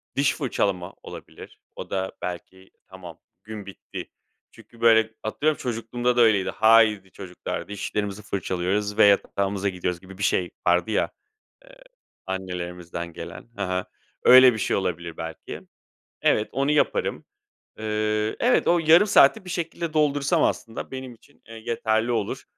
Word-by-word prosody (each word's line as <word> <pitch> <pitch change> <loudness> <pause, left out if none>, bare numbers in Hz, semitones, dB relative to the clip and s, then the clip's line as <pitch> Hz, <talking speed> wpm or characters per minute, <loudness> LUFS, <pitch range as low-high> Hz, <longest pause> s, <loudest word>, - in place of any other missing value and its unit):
diş 140 0 +2
fırçalama 100 - -2
olabilir. - - -11 0.2
O - - -8
da 95 -1 -2
belki 95 +2 -7 0.2
tamam, 90 -4 -11 0.2
gün 105 -2 -8
bitti 100 - -9 0.4
çünkü, 115 - -18
böyle, 110 -1 +4
atıyorum, 150 +8 0
çocukluğumda 120 +1 -2
da 120 - +6
öyleydi. 105 -4 +4
"Haydi 110 -4 +4
çocuklar, 90 -2 -6
dişlerimizi 105 0 -4
fırçalıyoruz 100 +2 -2
ve - - +7
yatağımıza 100 0 +1
gidiyoruz." 90 -2 -3
gibi 95 0 -13
bir 105 - -4
şey 90 -2 +1 0.2
vardı 90 +4 +2
ya, 105 - 0 0.5
eee, - - -16 0.5
annelerimizden 90 -2 -5
gelen. 115 - -9
Hı 100 - -4
hı. 90 0 -2 0.4
Öyle 130 0 +8
bir 110 - -5
şey - - 0
olabilir 85 -3 -3
belki. 80 -1 -7 0.6
Evet, 105 - +2
onu 140 +2 0
yaparım. 150 -1 0 0.5
Iıı, 110 0 -1
evet, 245 +1 +3
o 175 - +4
yarım 165 +5 +6
saati 190 -3 +5
bir 180 - -8
şekilde 170 -1 -4
doldursam 145 -2 +2
aslında 115 -1 -2
benim 130 -2 -7
için, 140 +5 -25
eee, 115 - -10
yeterli 110 +1 -1
olur. 110 -3 -2
105 Hz, 145 wpm, -24 LUFS, 95-120 Hz, 0.6 s, Öyle